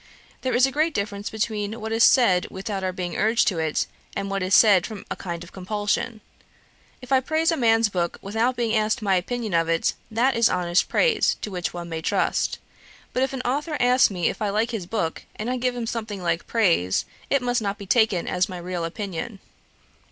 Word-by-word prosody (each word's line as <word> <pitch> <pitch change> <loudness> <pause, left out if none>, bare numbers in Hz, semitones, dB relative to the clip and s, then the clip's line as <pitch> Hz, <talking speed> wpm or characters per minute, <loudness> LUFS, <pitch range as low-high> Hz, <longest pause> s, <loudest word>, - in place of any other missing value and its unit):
There 255 - -1
is 250 +1 +5
a 270 - -1
great 310 +3 0
difference 200 0 -3
between 215 0 -3
what 220 +1 -5
is 225 +1 +3
said 190 -9 +5
without 195 0 -5
our 185 - 0
being 180 -2 -4
urged 225 +2 +2
to 180 -5 -3
it, 160 -1 0 0.3
and 195 0 -3
what 195 0 -1
is 185 +1 +3
said 200 -6 +6
from 215 -3 -9
a - - -1
kind 170 -2 -6
of 175 - -13
compulsion. 205 +3 -2 0.8
If 250 - -11
I 265 - +6
praise 315 +5 +1
a - - +1
man's 225 -4 +3
book 175 -4 -2
without 225 +5 0
being 235 -2 0
asked 215 +2 +1
my 195 -2 +2
opinion 220 +3 -2
of 165 0 +2
it, 165 0 +1 0.2
that 240 +4 +2
is 230 0 +4
honest 175 -1 +1
praise, 475 -3 +2
to 210 - -4
which 180 -2 -3
one 175 -1 -6
may 160 -1 -4
trust. - - 0 0.6
But 255 - 0
if 265 - +1
an 265 -2 -4
authour 295 +4 -1
asks 250 +1 +5
me 180 -4 -1
if - - -3
I 210 - +1
like 220 +4 0
his 205 -7 -4
book, 175 -6 -2
and 225 +4 -3
I 255 - -1
give 250 0 -1
him 240 -1 -3
something 215 -4 -4
like 170 -1 -1
praise, 170 - +2 0.2
it 275 -2 +2
must 245 -1 +1
not 200 0 -2
be 200 - -9
taken 215 -4 +2
as 180 +1 0
my 185 - -6
real 175 0 -4
opinion.' 195 +3 -5
210 Hz, 220 wpm, -24 LUFS, 185-240 Hz, 0.8 s, said